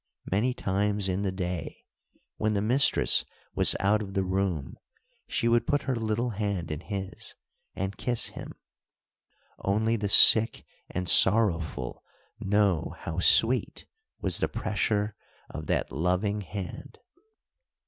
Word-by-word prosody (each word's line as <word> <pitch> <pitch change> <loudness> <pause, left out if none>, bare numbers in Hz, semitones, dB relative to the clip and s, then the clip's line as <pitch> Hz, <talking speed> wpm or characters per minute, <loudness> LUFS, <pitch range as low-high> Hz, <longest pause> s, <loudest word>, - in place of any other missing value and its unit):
Many 120 +7 +1
times 100 0 -1
in 95 +1 -1
the 100 -2 -1
day, 90 -3 -5 0.5
when 110 0 0
the 100 - 0
mistress 125 +6 +3 0.3
was - - +2
out 105 +3 +2
of 95 -2 -7
the 95 - +1
room, 95 -6 -2 0.5
she 115 - -1
would 115 0 +2
put 145 - +1
her 130 - -1
little 115 +1 -2
hand 100 -6 -3
in 75 - -4
his, 95 0 -6 0.4
and 95 +1 -4
kiss 120 -2 -1
him. - - -9 1.1
Only 110 +4 0
the 100 -1 -3
sick 110 +2 +6 0.2
and 90 0 -4
sorrowful 85 - +3 0.4
know 100 -5 0
how 80 +1 -4
sweet 115 +7 +3 0.3
was - - +2
the - - +1
pressure 105 0 -2 0.4
of 75 -1 -7
that - - -1
loving 90 +7 -1
hand. 95 0 -8
100 Hz, 130 wpm, -27 LUFS, 90-110 Hz, 1.1 s, sick